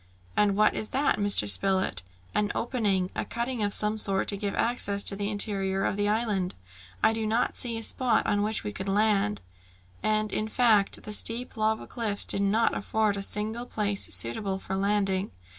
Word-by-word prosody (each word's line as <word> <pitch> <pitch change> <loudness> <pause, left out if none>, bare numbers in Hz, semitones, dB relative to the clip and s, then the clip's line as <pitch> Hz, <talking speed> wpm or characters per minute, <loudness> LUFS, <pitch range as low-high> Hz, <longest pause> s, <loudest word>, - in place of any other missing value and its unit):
"And 205 -1 +3
what 215 +1 +4
is 215 - -4
that, 275 -3 +1
Mr. 205 - +3
Spilett?" 185 - +1 0.3
"An 205 -1 +1
opening, 205 -7 0
a - - -1
cutting 235 0 -3
of 205 -1 +1
some 210 +1 +2
sort, 195 -2 +2
to 200 - 0
give 200 0 -3
access 205 -4 0
to 195 - +4
the 200 0 -3
interior 195 -2 0
of - - 0
the 205 0 0
island. 210 -4 -1 0.5
I 220 - +5
do 220 -1 -2
not 225 +3 0
see 235 -2 -2
a 225 - -5
spot 245 0 +1
on 205 - +1
which 215 +1 -1
we 105 - -4
could 190 - -6
land." 195 - +1 0.6
And, 215 0 0
in 215 - -1
fact, 220 -4 +2
the 210 - -5
steep 230 +4 +2
lava 220 0 0
cliffs 220 -4 -2
did 200 - +1
not 210 +3 +2
afford 215 0 0
a 200 - -4
single 215 +4 -3
place 205 -3 -1
suitable 190 - -1
for 190 0 -5
landing. 195 -1 0
210 Hz, 190 wpm, -27 LUFS, 195-220 Hz, 0.6 s, I